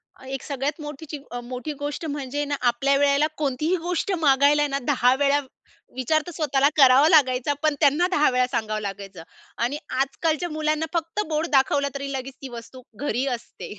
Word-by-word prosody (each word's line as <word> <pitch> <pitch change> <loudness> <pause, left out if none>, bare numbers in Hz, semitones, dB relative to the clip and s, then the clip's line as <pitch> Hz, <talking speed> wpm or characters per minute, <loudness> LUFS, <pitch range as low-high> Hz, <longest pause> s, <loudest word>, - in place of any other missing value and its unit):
अ, - - -16
एक 270 -1 -5
सगळ्यात 285 +2 -3
मोठीची 295 0 -7
अ, 245 - -4
मोठी 255 +4 -5
गोष्ट 290 +3 -4
म्हणजे 290 -1 -3
ना, 285 0 -2
आपल्या 270 +4 +1
वेळेला 285 +1 +3
कोणतीही 300 +4 0
गोष्ट 360 +2 -1
मागायला 285 +2 +4
ना, 275 -1 -2
दहा 250 -3 +4
वेळा 285 +1 +2 0.6
विचार 260 +5 +1
तर - - -5
स्वतःला 285 -4 +2
करावा 270 +1 +7
लागायचा 270 -4 +3
पण 305 -1 +2
त्यांना 295 +4 +3
दहा 300 -4 +4
वेळा 250 0 +2
सांगावं 215 -4 -2
लागायचं 195 -3 -7 0.4
आणि 260 +5 -1 0.2
आजकालच्या 315 +5 -1
मुलांना 310 0 -1
फक्त 335 +4 -1
बोर्ड 310 0 0
दाखवला 280 +1 +3
तरी 275 0 -4
लगेच 265 0 -5
ती 270 - -7
वस्तू 240 +2 -10 0.2
घरी 255 -1 0
असते. 230 - -11
280 Hz, 175 wpm, -24 LUFS, 255-300 Hz, 0.6 s, करावा